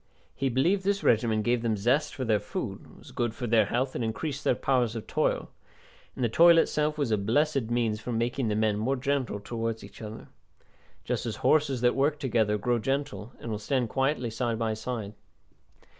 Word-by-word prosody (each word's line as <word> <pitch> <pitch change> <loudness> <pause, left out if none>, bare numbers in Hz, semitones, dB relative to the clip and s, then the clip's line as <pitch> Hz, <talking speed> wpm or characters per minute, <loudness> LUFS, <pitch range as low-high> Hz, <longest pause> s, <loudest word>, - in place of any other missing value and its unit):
He 135 - 0
believed 170 +11 +2
this 200 +1 0
regimen 110 -1 +2
gave 120 0 +1
them 115 -2 0
zest 125 +9 +1
for 130 - -3
their 110 -2 +2
food, 105 +1 -6
was - - -14
good 120 -2 -2
for 125 - -4
their 110 -3 +3
health, 130 +4 -1
and 120 - -2
increased 140 +6 -3
their - - +3
powers 125 -4 +1
of 110 - -5
toil; - - -1 0.6
and 130 - -3
the - - +4
toil 170 +8 +6
itself 150 -2 +1
was 140 -6 0
a 105 - +2
blessed 135 +3 +1
means 115 -3 0
for 120 - -5
making 120 +2 -1
the 105 - 0
men 110 -1 +1
more 130 +5 +1
gentle 135 -5 -1
towards 115 +1 -4
each - - -12
other; 110 0 -8 0.7
just - - -2
as - - -3
horses 145 -5 +3
that 120 0 +4
work 145 +2 +2
together 115 -7 +1
grow 120 +3 0
gentle, 135 -3 -3
and 115 - -6
will 105 - -3
stand 125 +2 0
quietly 135 -2 0
side 115 0 -1
by 110 -1 0
side. 110 -2 -5
120 Hz, 200 wpm, -28 LUFS, 110-135 Hz, 0.7 s, toil